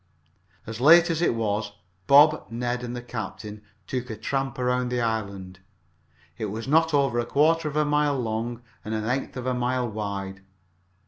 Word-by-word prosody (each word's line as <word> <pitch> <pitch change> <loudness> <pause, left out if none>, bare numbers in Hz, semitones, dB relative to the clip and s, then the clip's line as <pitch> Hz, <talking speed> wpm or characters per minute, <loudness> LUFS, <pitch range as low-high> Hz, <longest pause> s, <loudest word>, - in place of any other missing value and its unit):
As 115 +1 -7
late 170 +4 +7
as 165 0 -1
it 170 - +2
was, 105 -2 -2 0.3
Bob, 150 +2 +6
Ned 120 +1 -3
and 120 0 -5
the 120 - -6
captain 105 -2 -7 0.2
took 125 -1 -4
a 110 - -5
tramp 135 +4 -2
around 125 0 0
the 125 0 -1
island. 100 -5 -3 0.8
It 110 - -2
was 110 +3 -5
not 160 +3 +3
over 135 -5 +2
a 120 - -1
quarter 160 +2 +2
of 150 - -5
a 150 0 +2
mile 145 -1 +1
long 115 +1 -3 0.2
and 110 +1 -4
an 110 0 -3
eighth 130 +2 -2
of 125 - -5
a 130 - 0
mile 125 0 -1
wide. 100 -3 -5
120 Hz, 180 wpm, -25 LUFS, 110-140 Hz, 0.8 s, late